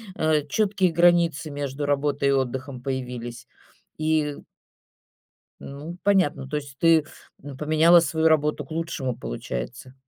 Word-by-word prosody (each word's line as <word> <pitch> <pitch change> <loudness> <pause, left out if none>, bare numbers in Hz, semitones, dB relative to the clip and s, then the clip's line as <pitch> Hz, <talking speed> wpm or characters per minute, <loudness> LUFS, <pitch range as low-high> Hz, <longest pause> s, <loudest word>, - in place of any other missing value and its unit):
э, 155 -2 +1
чёткие 195 +3 +1
границы 170 -2 +3
между 145 0 -4
работой 145 0 0
и - - +4
отдыхом 130 -1 -2
появились 125 -2 -5 0.5
и 155 -2 0 1.2
Ну, 150 +5 -8
понятно, 180 -9 +2
то 150 - -4
есть 140 -2 -6
ты, 165 -2 +5 0.4
м, 140 -2 -8
поменяла 155 +4 +5
свою 160 0 +1
работу 150 -1 +1
к - - -20
лучшему, 155 -6 -3
получается. 120 - -6
145 Hz, 125 wpm, -24 LUFS, 135-160 Hz, 1.2 s, ты